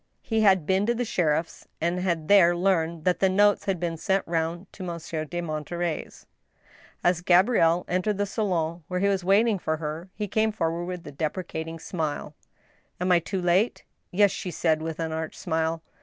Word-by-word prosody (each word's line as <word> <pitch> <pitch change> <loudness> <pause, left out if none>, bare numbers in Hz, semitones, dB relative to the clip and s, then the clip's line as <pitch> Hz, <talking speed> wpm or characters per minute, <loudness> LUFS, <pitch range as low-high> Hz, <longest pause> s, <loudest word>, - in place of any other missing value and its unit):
He 225 -1 0
had 190 -6 +4
been 190 +4 +1
to 235 - +2
the 245 +1 -1
sheriff's, 165 -5 -1
and 170 +2 0
had 170 -4 -1
there 180 -4 +6
learned 170 -3 0
that 180 -1 +2
the 190 - +4
notes 205 +2 +3
had 195 -3 -1
been 170 -1 -2
sent 190 +4 0
round 165 +2 -1
to - - -11
Monsieur 170 -3 -4
de 175 +3 -4
Monterey's. 165 +1 -4 0.8
As 175 -1 +2
Gabrielle 180 -2 +4
entered 185 +3 0
the 205 - +1
salon 175 -6 -2
where 180 0 -2
he 200 - +2
was 195 -2 +1
waiting 200 +3 +3
for 160 -2 -1
her, 160 +3 -5
he 210 -1 -3
came 220 +2 +1
forward 170 -4 -2
with 180 -1 -6
a 145 - -7
deprecating 160 +2 -4
smile. 155 -3 -4 0.3
" - - -38
Am 180 +1 +1
I 175 - +6
too 185 +2 -4
late 185 +7 +2
> - - -49
" - - -48
Yes," 200 +1 +4
she 185 - -5
said, 160 -2 +1
with 160 0 -5
an 165 -1 -2
arch 160 0 -4
smile. 160 -1 -1
175 Hz, 200 wpm, -26 LUFS, 165-190 Hz, 0.8 s, there